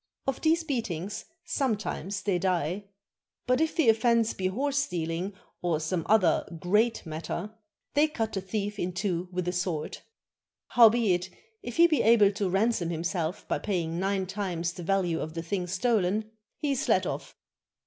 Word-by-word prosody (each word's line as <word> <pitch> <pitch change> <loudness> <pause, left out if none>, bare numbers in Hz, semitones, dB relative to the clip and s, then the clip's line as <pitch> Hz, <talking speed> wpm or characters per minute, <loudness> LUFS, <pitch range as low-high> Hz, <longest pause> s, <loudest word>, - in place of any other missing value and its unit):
Of 270 -1 -2
these 325 +1 +3
beatings 210 - -3 0.2
sometimes 215 - -2
they 190 -4 +1
die. 180 +1 0 0.6
But 255 +3 +2
if 320 0 +1
the 320 -7 +2
offense 225 0 +4
be 185 - -1
horse 280 +8 0
steaUng 170 +2 -2 0.3
or 170 -3 +1
some 160 +1 -2
other 195 -7 +4 0.2
great 210 +7 +2
matter, 160 +2 -4
83 - - -6
CHINA - - -20 0.4
they 300 +1 +4
cut 225 -7 -3
the 195 - -2
thief 205 +2 -3
in 180 +1 -2
two 180 -1 -2
with 180 -1 -2
a - - +2
sword. 175 -4 -2 0.7
Howbeit, 220 -6 +5 0.3
if 240 - -7
he 340 - +8
be 310 -7 +3
able 215 -3 +6
to 200 -1 -1
ransom 195 -2 +1
himself 170 +1 -2
by - - 0
paying 170 -4 -2
nine 195 0 0
times 180 -3 -2
the 180 - -8
value 175 -2 +1
of 160 +1 -5
the 165 - -3
thing 180 +1 -2
stolen, 210 +2 +1 0.3
he 295 -2 -1
is 275 -1 -1
let - - +4
off. - - -5
195 Hz, 170 wpm, -28 LUFS, 175-225 Hz, 0.7 s, he